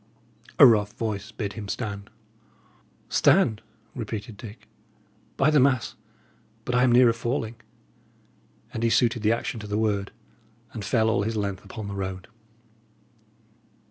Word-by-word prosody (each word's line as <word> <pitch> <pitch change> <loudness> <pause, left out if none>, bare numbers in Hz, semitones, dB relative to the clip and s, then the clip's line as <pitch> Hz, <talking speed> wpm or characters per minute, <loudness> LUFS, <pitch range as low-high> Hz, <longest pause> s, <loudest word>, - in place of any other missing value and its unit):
A 140 - +10
rough 105 -4 +4
voice 105 -2 -4
bid 100 -3 -4
him 105 0 -7
stand. 100 -2 -5 1.0
"Stand?" 140 - +3 0.3
repeated 110 -1 -6
Dick. 105 +1 -11 0.7
"By 140 +3 +3
the 150 - +5
mass, 130 -2 +2 0.7
but 125 - -2
I 125 - +3
am 125 -1 +4
nearer 120 -1 +6
falling." 115 0 -3 1.2
And 115 - -4
he 115 - +2
suited 115 0 +2
the 105 +1 +3
action 115 0 -2
to 105 - -8
the 105 0 -2
word, 105 -2 0 0.6
and 110 - -6
fell 110 +2 +1
all 110 -3 +2
his 110 +2 -2
length 100 -2 -3
upon 110 -3 -8
the 100 - -5
road. 95 -1 -5
110 Hz, 140 wpm, -25 LUFS, 100-120 Hz, 1.2 s, A